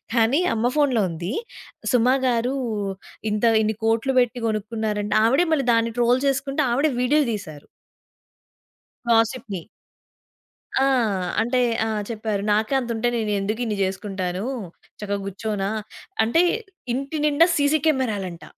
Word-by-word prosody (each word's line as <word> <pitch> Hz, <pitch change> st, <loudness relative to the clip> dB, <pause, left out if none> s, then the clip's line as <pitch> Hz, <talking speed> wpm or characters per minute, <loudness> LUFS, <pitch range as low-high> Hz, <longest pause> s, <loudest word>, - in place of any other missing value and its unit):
కానీ 235 Hz, +8 st, +3 dB
అమ్మ 240 Hz, +3 st, +1 dB
ఫోన్‌లో 260 Hz, -8 st, +3 dB
ఉంది. 170 Hz, +5 st, -4 dB, 0.6 s
'సుమ' 250 Hz, 0 st, +4 dB, 0.2 s
గారు 245 Hz, +2 st, +1 dB, 0.8 s
ఇంత 210 Hz, +2 st, -2 dB, 0.2 s
ఇన్ని 220 Hz, 0 st, 0 dB
కోట్లు 230 Hz, +4 st, +1 dB
బెట్టి 245 Hz, 0 st, -2 dB
కొనుక్కున్నారంట 215 Hz, -1 st, -2 dB
ఆవిడే 270 Hz, +10 st, +4 dB
మళ్ళీ 275 Hz, -4 st, 0 dB
దాన్ని 230 Hz, 0 st, +1 dB
ట్రోల్ 245 Hz, +2 st, +3 dB
చేసుకుంట 275 Hz, +1 st, -1 dB
ఆవిడే 285 Hz, +5 st, +2 dB
వీడియో‌లు 285 Hz, +2 st, +3 dB
తీశారు. 155 Hz, -8 st, -8 dB, 1.4 s
గాసిప్‌ని. 225 Hz, -5 st, +1 dB, 1.2 s
ఆ! -, -, +4 dB, 0.6 s
అంటే 240 Hz, +3 st, +1 dB, 0.3 s
ఆ! -, -, -1 dB, 0.2 s
చెప్పారు. 215 Hz, -3 st, -2 dB
నాకే 215 Hz, +5 st, +1 dB
అంతుంటే 235 Hz, -1 st, -1 dB
నేనెందుకిన్ని 215 Hz, +1 st, -1 dB
జేసుకుంటాను. 190 Hz, -1 st, -3 dB, 0.6 s
చక్కగా 200 Hz, -1 st, -2 dB
గూర్చోనా? 200 Hz, 0 st, -3 dB, 0.5 s
అంటే, 325 Hz, +10 st, +3 dB, 0.5 s
ఇంటి 275 Hz, +4 st, -3 dB
నిండా 300 Hz, +3 st, +5 dB
సీసీ 290 Hz, +1 st, +3 dB
కెమెరా‌లంట. 210 Hz, -, -1 dB
230 Hz, 115 wpm, -23 LUFS, 210-260 Hz, 1.4 s, నిండా